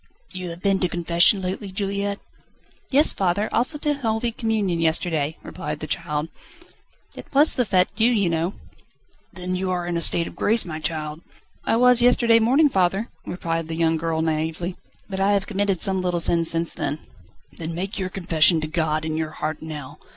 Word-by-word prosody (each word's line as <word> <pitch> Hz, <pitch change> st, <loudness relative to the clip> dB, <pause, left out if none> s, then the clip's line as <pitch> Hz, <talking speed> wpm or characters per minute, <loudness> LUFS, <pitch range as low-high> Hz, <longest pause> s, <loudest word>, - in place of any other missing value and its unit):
"You 185 Hz, -1 st, -5 dB
have 170 Hz, +1 st, -9 dB
been 195 Hz, -1 st, +2 dB
to 180 Hz, -, +1 dB
confession 175 Hz, +3 st, +3 dB
lately, 190 Hz, +2 st, -4 dB
Juliette?" 200 Hz, +1 st, -2 dB, 0.7 s
"Yes, 285 Hz, +3 st, +4 dB
father; 195 Hz, +3 st, 0 dB
also 255 Hz, +6 st, +1 dB
to 295 Hz, 0 st, 0 dB
holy 235 Hz, -3 st, -1 dB
communion, 215 Hz, -7 st, -1 dB
yesterday," 160 Hz, -2 st, 0 dB
replied 150 Hz, 0 st, -6 dB
the 155 Hz, -, -5 dB
child. 150 Hz, +1 st, -2 dB, 0.8 s
"It -, -, -11 dB
was 295 Hz, +3 st, +6 dB
the 250 Hz, -, 0 dB
Fête 185 Hz, -3 st, +2 dB
Dieu, 225 Hz, +2 st, +3 dB
you 215 Hz, -6 st, +2 dB
know." 170 Hz, +3 st, -1 dB, 0.8 s
"Then 185 Hz, 0 st, -4 dB
you 185 Hz, +1 st, -2 dB
are 180 Hz, -1 st, -1 dB
in 175 Hz, -1 st, -2 dB
a -, -, -1 dB
state 170 Hz, 0 st, +4 dB
of -, -, -9 dB
grace, 225 Hz, +2 st, +1 dB
my 155 Hz, -3 st, -5 dB
child?" 155 Hz, -1 st, -3 dB, 0.4 s
"I -, -, +2 dB
was 250 Hz, 0 st, +5 dB
yesterday 235 Hz, -2 st, +5 dB
morning, 265 Hz, +7 st, +4 dB
father," 195 Hz, -1 st, 0 dB, 0.2 s
replied 165 Hz, -2 st, -3 dB
the 165 Hz, -, -4 dB
young 165 Hz, 0 st, +2 dB
girl 160 Hz, 0 st, -1 dB
naïvely, 160 Hz, +3 st, -2 dB, 0.3 s
"but 190 Hz, -1 st, -5 dB
I 195 Hz, +1 st, +3 dB
have 200 Hz, -1 st, +1 dB
committed 195 Hz, -2 st, -1 dB
some 190 Hz, -2 st, 0 dB
little 180 Hz, -1 st, -1 dB
sins 170 Hz, 0 st, +1 dB
since 165 Hz, 0 st, -1 dB
then." 150 Hz, +2 st, -4 dB, 0.5 s
"Then 165 Hz, 0 st, -5 dB
make 190 Hz, +4 st, -3 dB
your 185 Hz, -1 st, -2 dB
confession 170 Hz, -3 st, +4 dB
to 155 Hz, -, -2 dB
God 155 Hz, -1 st, -1 dB
in 155 Hz, 0 st, -2 dB
your 160 Hz, -1 st, -2 dB
heart 155 Hz, 0 st, -3 dB
now. 150 Hz, -4 st, -7 dB
180 Hz, 190 wpm, -23 LUFS, 160-205 Hz, 0.8 s, was